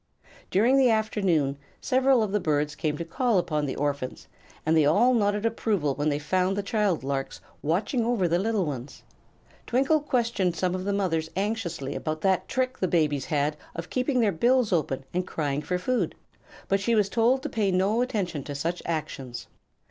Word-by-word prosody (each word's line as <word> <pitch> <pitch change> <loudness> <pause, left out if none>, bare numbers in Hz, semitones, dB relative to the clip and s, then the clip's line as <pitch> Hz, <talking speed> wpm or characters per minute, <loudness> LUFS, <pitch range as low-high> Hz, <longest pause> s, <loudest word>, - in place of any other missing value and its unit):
During 235 +8 +4
the 260 -2 +5
afternoon 190 -11 +1 0.2
several 260 -2 +3
of 210 - -2
the 210 - +1
birds 150 -3 0
came 150 0 -2
to 170 - -4
call 230 +6 +1
upon 150 -4 0
the 130 - -3
orphans, 140 -3 -3 0.4
and 160 +1 +3
they 160 - +5
all 205 - +4
nodded 205 -2 +1
approval 210 -10 0
when 145 +2 0
they 145 - 0
found 185 +6 0
the 205 - -1
child 205 - 0
larks 135 0 -3 0.2
watching 205 - 0
over 225 -6 +1
the 170 +1 +1
little 210 -1 0
ones. 135 -3 -6 0.6
Twinkle 275 +6 +3
questioned 230 - 0
some 180 +2 0
of 185 0 -3
the 200 - 0
mothers 170 -5 0
anxiously 190 -8 -2
about 155 0 -3
that 190 -2 +1
trick 255 0 -1
the 185 - +1
babies 150 -6 +1
had 150 0 0 0.2
of 165 +1 -6
keeping 255 0 +1
their 215 -3 +3
bills 240 +4 +2
open 135 -5 0
and 180 +1 -1
crying 145 -2 -2
for 180 +4 -2
food, 250 +8 -1 0.5
but 195 - +2
she 230 +4 +1
was 210 -3 +3
told 240 +5 +2
to - - -3
pay 210 -3 0
no 195 +5 +2
attention 190 - -2
to 145 - -5
such 165 +5 -2
actions. 150 -6 -4
185 Hz, 185 wpm, -26 LUFS, 155-225 Hz, 0.6 s, the